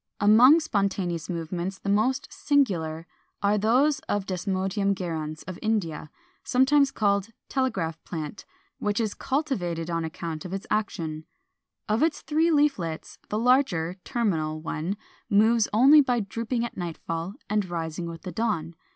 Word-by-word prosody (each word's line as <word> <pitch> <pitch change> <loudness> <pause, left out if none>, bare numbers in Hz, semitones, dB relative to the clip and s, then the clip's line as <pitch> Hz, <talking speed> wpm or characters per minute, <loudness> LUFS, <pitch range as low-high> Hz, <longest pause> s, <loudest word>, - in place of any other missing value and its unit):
] - - -55
474. 205 +1 +5
Among 310 +5 +7
spontaneous 195 - -1
movements 175 +2 -3
the - - -9
most 215 +6 +1
singular 170 - +1 0.4
are 205 +1 +3
those 265 +7 +3
of 205 -2 0
Desmodium 195 +2 -1
gyrans 160 -4 -4
of 185 -2 -6
India, 175 -9 -1 0.3
sometimes 275 +2 +4
called 200 -5 +1 0.2
Telegraph 190 - -1
plant, 160 +2 -6 0.4
which 205 +1 0
is 220 -3 0
cultivated 180 - -2
on 165 0 -1
account 160 -1 -5
of 185 - -6
this 195 +2 -5
action. 160 -7 -2 0.6
Of 215 +2 +1
its 320 0 +1
three 320 +2 +2
leaflets, 280 - 0
the 210 - -1
larger 220 -9 +2
(terminal) 160 -10 -1
one 165 +4 -3 0.3
moves 220 +2 +4
only 275 +8 +7
by 250 -3 +1
drooping 230 +3 -2
at 235 - -7
nightfall 170 +1 -4
and 210 -2 0
rising 165 0 -3
with 165 -1 -8
the 185 - -5
dawn. 195 -8 -1
200 Hz, 145 wpm, -26 LUFS, 165-235 Hz, 0.6 s, Among